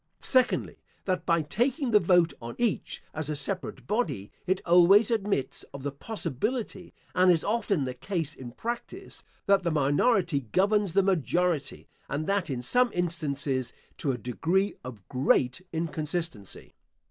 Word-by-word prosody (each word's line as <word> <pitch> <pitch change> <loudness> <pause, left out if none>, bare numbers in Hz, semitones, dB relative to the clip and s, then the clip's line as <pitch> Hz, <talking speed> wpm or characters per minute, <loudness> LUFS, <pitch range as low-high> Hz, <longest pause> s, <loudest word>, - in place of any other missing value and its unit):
Secondly, 255 -2 +2 0.3
That 185 -2 -1
by 170 -2 +3
taking 245 - 0
the 210 - +7
vote 175 -4 +3
on 115 0 -7
each, 235 -4 -1
as 155 -1 -3
a 150 - -1
separate 185 +6 -5
body, 160 - -2 0.2
it 185 +1 +2
always 180 +6 +6
admits 200 - 0
of 135 - -8
the 145 - -2
possibility, 190 - -4 0.2
and 185 0 +5
is 165 -2 +2
often 205 - 0
the 130 - -3
case 165 +2 -3
in 120 -4 -9
practice, 240 - -6 0.2
that 200 -1 +4
the 175 - 0
minority 155 - +2
governs 195 - +1
the 195 +1 +4
majority, 175 -4 0 0.2
and 145 +3 -2
that, 195 -2 0
in 125 -3 -3
some 250 - +3
instances, 145 -7 -1 0.3
to 140 - 0
a 125 - -3
degree 170 - 0
of 115 -6 -10
great 130 +2 +2
inconsistency. 160 - -4
170 Hz, 145 wpm, -28 LUFS, 140-200 Hz, 0.3 s, the